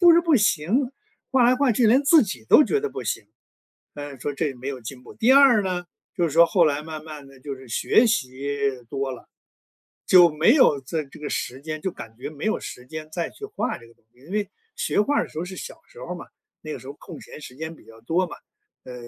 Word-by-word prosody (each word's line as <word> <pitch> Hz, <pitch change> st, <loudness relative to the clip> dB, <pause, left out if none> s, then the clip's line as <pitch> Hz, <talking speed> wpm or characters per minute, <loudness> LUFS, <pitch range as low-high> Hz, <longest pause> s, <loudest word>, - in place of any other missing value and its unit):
不 345 Hz, -2 st, +8 dB
是 340 Hz, -, +6 dB
不 330 Hz, -2 st, +3 dB
行， 215 Hz, -, +2 dB, 0.4 s
画 260 Hz, -2 st, +4 dB
来 245 Hz, +1 st, +5 dB
画 280 Hz, -1 st, +3 dB
去 230 Hz, +2 st, +3 dB
连 250 Hz, +6 st, +5 dB
自 310 Hz, +2 st, +6 dB
己 125 Hz, -, -6 dB
都 300 Hz, -, +8 dB
觉 430 Hz, -, 0 dB
得 435 Hz, -, -2 dB
不 -, -, -6 dB
行， -, -, -3 dB, 0.7 s
唉， 145 Hz, -1 st, -8 dB
说 145 Hz, +3 st, -3 dB
这 140 Hz, 0 st, -2 dB
没 125 Hz, +1 st, -10 dB
有 135 Hz, -2 st, -5 dB
进 125 Hz, +2 st, -9 dB
步； -, -, -13 dB
第 230 Hz, -, +3 dB
二 270 Hz, -6 st, +7 dB
呢， 180 Hz, -2 st, -2 dB, 0.3 s
就 175 Hz, -, +1 dB
是 165 Hz, -, 0 dB
说 165 Hz, +3 st, +6 dB
后 180 Hz, -1 st, +3 dB
来 145 Hz, -2 st, +1 dB
慢 155 Hz, -1 st, -8 dB
慢 150 Hz, -3 st, -9 dB
地 135 Hz, -1 st, -17 dB
就 140 Hz, +2 st, -6 dB
是 130 Hz, -1 st, -14 dB
学 220 Hz, -, +3 dB
习 140 Hz, -, -1 dB, 0.3 s
多 135 Hz, 0 st, -3 dB
了， 125 Hz, -, -12 dB, 0.8 s
就 175 Hz, -2 st, +7 dB
没 155 Hz, -, +4 dB
有 150 Hz, -, +5 dB
在 155 Hz, +4 st, -3 dB
这 135 Hz, -, -15 dB
个 150 Hz, -, -4 dB
时 130 Hz, +2 st, -3 dB
间， 155 Hz, +1 st, -6 dB
就 190 Hz, -, -1 dB
感 110 Hz, -9 st, -11 dB
觉 125 Hz, -, -6 dB
没 150 Hz, +5 st, -6 dB
有 220 Hz, -, +1 dB
时 125 Hz, -, -9 dB
间 155 Hz, +2 st, -8 dB
再 170 Hz, 0 st, -2 dB
去 425 Hz, -, -11 dB
画 415 Hz, +1 st, -3 dB
这 115 Hz, -, -15 dB
个 115 Hz, -, -19 dB
东 -, -, -33 dB
西。 125 Hz, -, -25 dB
因 170 Hz, -, -11 dB
为 205 Hz, -1 st, -1 dB, 0.3 s
学 -, -, -1 dB
画 290 Hz, +7 st, 0 dB
儿 -, -, +2 dB
的 -, -, -11 dB
时 -, -, -8 dB
候 165 Hz, -, -2 dB
是 185 Hz, 0 st, -8 dB
小 -, -, -8 dB
时 -, -, -15 dB
候 -, -, -5 dB
嘛， -, -, -8 dB, 0.4 s
那 155 Hz, -, -6 dB
个 -, -, -5 dB
时 -, -, -14 dB
候 140 Hz, -, -7 dB
空 -, -, -11 dB
闲 -, -, -11 dB
时 125 Hz, -, -10 dB
间 160 Hz, +4 st, -7 dB
比 -, -, -20 dB
较 115 Hz, 0 st, -15 dB
多 175 Hz, +10 st, +1 dB
嘛， -, -, -9 dB, 0.5 s
呃， 125 Hz, -, -9 dB
160 Hz, 275 characters per minute, -24 LUFS, 140-225 Hz, 0.8 s, 不